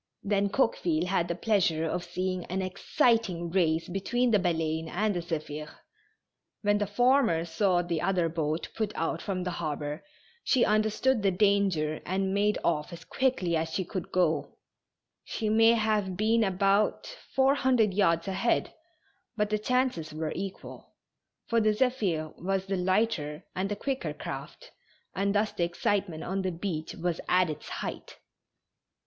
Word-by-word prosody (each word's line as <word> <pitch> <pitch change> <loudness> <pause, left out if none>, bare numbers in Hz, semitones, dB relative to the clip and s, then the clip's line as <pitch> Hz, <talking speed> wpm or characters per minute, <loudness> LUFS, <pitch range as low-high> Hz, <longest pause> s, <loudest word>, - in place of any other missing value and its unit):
Then 200 0 +1
Coqueville 180 -8 +1
had 180 -2 0
the 170 - -2
pleasure 175 -5 +1
of 175 +2 -2
seeing 185 +1 -3
an 190 +2 -2
exci 230 - +2
ting 175 -5 -5
race 165 -3 +1
between 235 +7 0
the 210 - +4
Baleine 160 -3 -1
and 205 +2 0
the - - 0
Zephir. 155 -2 -5 0.9
When 205 0 +3
the 205 - 0
former 235 -6 +3
saw 180 +1 +1
the 170 -2 -2
other 180 -2 +1
boat 160 -1 -2
put 215 -2 -1
out 165 +1 -2
from 185 -3 -3
the 180 - -2
harbor, 150 0 -3 0.4
she 255 - +3
understood 215 +3 +2
the 200 - +3
danger 190 -6 +1
and 190 +1 -1
made 205 +1 +2
off 155 -3 0
as 170 -1 -10
quickly 250 -10 0
as 160 0 -1
she 190 - -1
could 185 0 -5
go; 175 -3 0 0.7
she 220 -2 -3
may 225 +1 +6
have 215 -5 0
been 220 +2 +3
about 195 - +1 0.2
four 270 +1 +5
hundred 250 -7 +2
yards 170 -4 +2
ahead, 195 +5 0 0.6
but 210 -1 0
the 215 - +1
chances 250 -8 0
were 155 0 -2
equal, 195 0 -7 0.5
for 230 -1 +2
the 215 0 +3
Zephir 205 - 0
was 195 0 0
the 195 0 -1
lighter 180 -5 0
and 190 +2 -1
the 205 - -1
quicker 265 +5 -3
craft, - - -8 0.4
and 200 +1 0
thus 210 +1 +2
the 175 - -2
excitement 175 0 -1
on 190 +2 -2
the 185 -1 -1
beach 165 -2 -4
was 170 -1 -2
at 180 -3 +3
its 150 0 -8
height. - - -6
190 Hz, 160 wpm, -28 LUFS, 170-215 Hz, 0.9 s, may